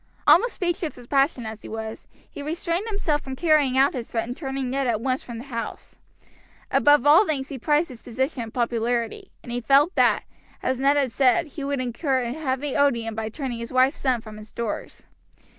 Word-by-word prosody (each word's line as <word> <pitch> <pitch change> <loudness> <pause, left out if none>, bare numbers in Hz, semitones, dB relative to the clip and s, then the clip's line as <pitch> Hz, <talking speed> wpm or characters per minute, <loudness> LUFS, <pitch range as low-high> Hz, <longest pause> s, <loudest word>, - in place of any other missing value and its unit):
Almost 470 +7 +5
speechless 345 -3 -2
with 245 -1 -14
passion 275 -3 +2
as 220 -1 -7
he - - -10
was, 220 0 -6 0.2
he - - -9
restrained 335 +6 -2
himself 345 -9 0
from 265 -1 -6
carrying 300 -4 +3
out 270 +1 +4
his 240 -3 -5
threat 225 -1 -1
and 245 - -5
turning 270 -3 -3
Ned 270 0 0
at 225 -3 +1
once 255 +2 -1
from 235 -2 -8
the 235 - -7
house. 235 -4 -7 0.7
Above 290 -2 +5
all 320 +8 +7
things 275 -3 -2
he 270 - -6
prized 300 +6 +2
his 245 -3 -11
position 260 +3 -2
and 225 -1 -6
popularity, 235 -1 -1
and 240 - -8
he 245 +1 -2
felt 280 +8 +4
that, - - +3 0.4
as 260 -1 0
Ned 280 +2 +3
had 270 -4 +1
said, 255 -1 +3
he 290 0 -7
would 280 -1 -1
indeed 245 -2 -4
incur 265 -5 +1
a 240 0 -3
heavy 280 -2 -2
odium 235 -6 +2
by 220 0 -3
turning 250 -1 -5
his 230 - -6
wife's 260 +3 +3
son 255 -4 +1
from 215 -1 -10
his 215 0 -12
doors. 230 -3 -5
260 Hz, 210 wpm, -24 LUFS, 235-290 Hz, 0.7 s, all